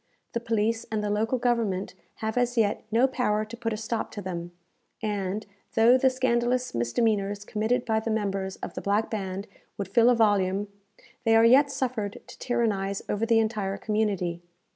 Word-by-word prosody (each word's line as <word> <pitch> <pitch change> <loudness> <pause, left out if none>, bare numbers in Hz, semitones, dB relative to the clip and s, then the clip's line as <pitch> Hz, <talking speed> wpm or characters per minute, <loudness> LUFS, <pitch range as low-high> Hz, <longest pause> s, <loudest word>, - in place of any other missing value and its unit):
The 235 - 0
police 225 0 0
and 215 -1 -1
the 205 - -1
local 220 +5 +1
government 230 -6 0 0.3
have 220 - -1
as 245 0 +1
yet 210 -2 +2
no 235 +4 +4
power 215 -5 0
to 225 +2 -9
put 230 -1 -3
a 215 - -2
stop 225 +1 -3
to 205 - -5
them, 175 -2 -5 0.5
and, 205 -1 -2 0.3
though 230 +2 +6
the 260 +1 +4
scandalous 250 -1 0
misdemeanours 200 - 0
committed 220 +4 0
by 220 -2 +1
the 220 - -4
members 195 -3 -1
of - - -5
the - - -5
Black 205 +2 0
Band 195 -2 -3 0.3
would 195 -2 -4
fill 230 +4 +5
a 250 - +5
volume, 205 -2 +2 0.5
they 225 -2 +4
are 225 0 +6
yet 270 +5 +6
suffered 245 -7 -3
to - - -13
tyrannize 205 -5 -1
over 215 +2 0
the 230 -1 +4
entire 215 -3 0
community. 200 -6 -1
220 Hz, 180 wpm, -27 LUFS, 200-235 Hz, 0.5 s, though